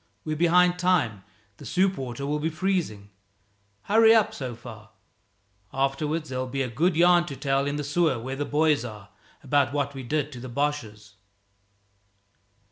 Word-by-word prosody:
"We're 155 - -2
behind 175 +2 +3
time 145 - +1 0.3
the - - -13
soup 190 +1 +1
water'll 140 +2 -3
be 160 +2 -1
freezing. 155 - -2 0.7
Hurry 225 +2 +5
up, 220 - +3
so 130 -5 -5
far. 110 -2 -12 0.8
Afterwards 150 +4 -1
there'll 130 0 -3
be 135 +2 -2
a 125 - -4
good 165 +8 +1
yarn 175 +1 +4
to 140 - -6
tell 135 +1 0
in 145 - -2
the 145 - -3
sewer 150 -1 +1
where 130 +4 -5
the 145 - -2
boys 150 -3 +2
are, 105 -4 -9 0.3
about 140 0 +1
what 140 -1 -1
we 135 - -7
did 145 +3 -2
to 125 - -9
the 130 +1 -8
Boches." 110 -7 -3
145 Hz, 160 wpm, -26 LUFS, 125-165 Hz, 0.8 s, Hurry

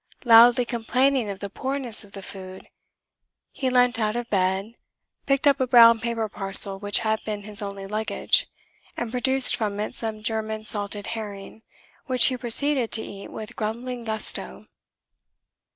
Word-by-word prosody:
Loudly 240 +1 +6
complaining 250 +1 0
of 195 -1 -7
the 200 - -6
poorness 260 -2 -2
of 200 -1 -18
the 195 - -9
food, 185 -1 -9 0.8
he 260 - -3
leant 245 -1 +2
out 215 0 -1
of 240 0 -4
bed, 190 +2 -1 0.5
picked 275 +1 +1
up 280 -1 +3
a 260 - 0
brown 230 -2 +6
paper 230 -1 -3
parcel 195 -1 +3
which 205 0 0
had 220 -1 -2
been 210 -1 -6
his 210 0 -2
only 200 -1 -7
luggage, 215 +2 0 0.5
and 235 -2 -4
produced 265 +1 +4
from 210 -3 -4
it 210 - -4
some 220 -2 -5
German 220 -1 -4
salted 205 -1 -1
herring, 210 -1 -9 0.5
which 255 -2 +4
he 260 - +3
proceeded 250 +1 +2
to 220 - +3
eat 200 0 -10
with 220 +2 -9
grumbling 235 +3 -5
gusto. 220 -1 -2
220 Hz, 155 wpm, -23 LUFS, 205-245 Hz, 0.8 s, Loudly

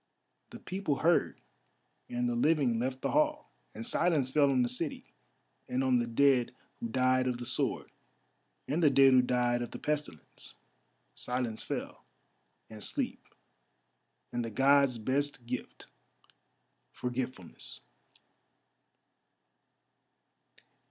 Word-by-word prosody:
The - - -9
people 185 -6 -2
heard, 170 0 +3 0.7
and 120 0 -1
the 120 - 0
living 125 -2 +2
left 130 +2 -2
the - - 0
hall, 300 0 +1 0.2
and 230 - -6
silence 165 - +1
fell 145 0 +4
on 130 -2 +3
the - - +1
city, 135 +6 -5 0.6
and 130 +1 0
on 130 -2 +3
the 120 - -1
dead 125 0 +3 0.2
who 115 - -3
died 130 +2 +2
of 125 -1 -1
the 120 - -7
sword, - - -1 0.8
and 155 +5 0
the 155 - +6
dead 135 -1 +6
who 130 - +7
died 125 -1 +1
of 120 - -4
the - - -7
pestilence. 150 - -5 0.6
Silence 125 -3 -3
fell, - - -5 0.6
and 110 -2 -9
sleep, - - -2 1.0
and 120 0 -2
the 115 - -4
Gods' 135 +1 +4
best 130 +2 -1
gift—forgetfulness. 125 -2 -8
130 Hz, 120 wpm, -31 LUFS, 120-140 Hz, 1.0 s, who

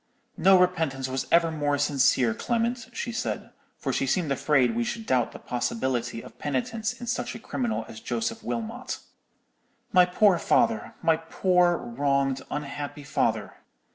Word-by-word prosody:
"'No 190 +1 +6
repentance 160 -8 +1
was 130 0 -3
ever 165 -1 +4
more 145 -2 0
sincere, 135 -4 +3
Clement,' 235 - -1
she 240 0 -4
said, 235 0 -3 0.3
for 135 - -2
she 135 - 0
seemed 155 +2 0
afraid 130 -4 +2
we 120 - +1
should 225 - -4
doubt 125 - +1
the - - -9
possibility 120 -1 -2
of - - -14
penitence 215 - -1
in 245 - -9
such 245 0 -2
a - - -7
criminal 235 0 -2
as - - -9
Joseph 230 0 -3
Wilmot. 235 +2 -4 1.0
'My 180 -1 +7
poor 185 0 +4
father—my 220 -8 +2
poor 175 +1 +2
wronged, 135 +2 0
unhappy 145 0 -5
father! 135 - -1
160 Hz, 145 wpm, -26 LUFS, 135-225 Hz, 1.0 s, My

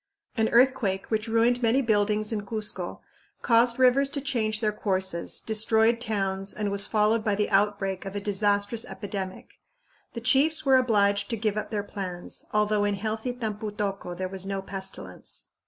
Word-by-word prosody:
An 220 -1 +1
earthquake, 235 -6 +2
which 220 +1 0
ruined 230 +2 +2
many 235 +3 +3
buildings 210 -1 +1
in 210 -2 -2
Cuzco, 210 -4 -4 0.4
caused 235 0 +4
rivers 260 +2 +4
to 285 - -3
change 230 -6 -1
their 215 -2 +1
courses, 190 -4 -1
destroyed 220 +1 +2
towns, 195 -4 -2
and 210 -1 -2
was 200 0 +2
followed 215 +1 +2
by 210 -2 +1
the 210 +1 -1
outbreak 195 -1 +1
of 195 0 -7
a - - -1
disastrous 205 +2 0
epidemic. 195 -2 -7 0.5
The 230 - -5
chiefs 290 +7 +3
were 265 -1 +6
obliged 205 -5 +2
to 230 - -1
give 215 -1 -1
up 215 - -3
their 210 -2 -2
plans, 185 -4 -4
although 210 0 +2
in 205 0 +1
healthy 220 +4 -3
Tampu 220 -3 -4
tocco 195 -4 -4
there 185 0 -2
was 190 0 -5
no 195 0 -3
pestilence. 195 0 -5
210 Hz, 170 wpm, -26 LUFS, 200-230 Hz, 0.5 s, were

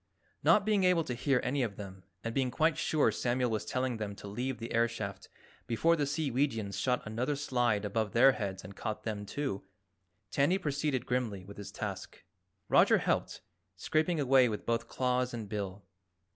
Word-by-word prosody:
Not 205 - +5
being 210 -3 +2
able 180 -2 +4
to 130 - -4
hear 125 +2 +1
any 135 +2 0
of 110 -5 -1
them 95 -2 -9 0.2
and 115 - -3
being 130 0 +1
quite 155 +5 +2
sure 150 -7 +2
Samuel 120 +2 0
was 110 -1 -1
telling 125 -2 -1
them 105 -2 -4
to 100 - -10
leave 125 +5 -3
the 115 - -6
air 115 +1 +4
shaft 100 -4 -6 0.4
before 165 +9 +3
the 145 -3 0
Seeweegians 130 - -1
shot 125 +2 +1
another 120 +7 -1
slide 120 -7 +1
above 105 0 -1
their 130 +3 +7
heads 100 -6 -4
and 95 +2 -10
caught 110 - -4
them, 105 -2 -4
too, 135 -8 -3 0.7
Tandy 145 +7 +3
proceeded 145 -6 -1
grimly 115 -7 -2
with 100 +1 -11
his 100 -2 -7
task. - - -6 0.4
Roger - - +5
helped, - - -1 0.3
scraping 155 +1 0
away 130 -3 +5
with 105 -2 -4
both 115 0 0
claws 125 -1 0
and 110 -3 -5
bill. 100 -2 -4
120 Hz, 180 wpm, -31 LUFS, 105-140 Hz, 0.7 s, their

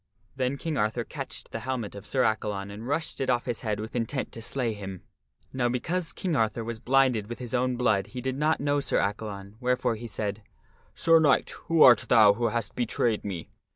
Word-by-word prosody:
Then 130 +1 -1
King 155 0 -3
Arthur 110 +2 0
catched 135 +2 -6
the 115 - -4
helmet 120 -2 -3
of 100 0 -9
Sir 130 -2 +2
Accalon 105 -2 -1
and 110 +4 -8
rushed 150 +1 -1
it 130 - -1
off 120 -1 +1
his 120 -3 -3
head 105 -3 -2
with 110 +2 -6
intent 125 +3 -2
to 115 - -9
slay 120 0 -2
him. 95 -3 -7 0.5
Now 125 -2 +1
because 165 +8 -1
King 180 -4 -2
Arthur 115 -1 +1
was 115 0 -5
blinded 125 -4 +2
with 120 - -5
his 125 -1 -6
own 125 0 +1
blood 110 -6 +1
he 125 - -7
did 130 +1 -2
not 150 +3 +1
know 145 0 +1
Sir 140 - 0
Accalon, 100 0 -3
wherefore 125 -1 +1
he 115 +2 -6
said, 105 -1 -3 0.3
" - - -34
Sir 165 0 +5
Knight, 145 -4 +3 0.2
who 165 -1 +5
art 125 -2 +7
thou 110 -4 +7
who 120 +3 0
hast 115 -2 -2
betrayed 120 -2 0
me 95 -5 -5
120 Hz, 215 wpm, -27 LUFS, 110-130 Hz, 0.5 s, art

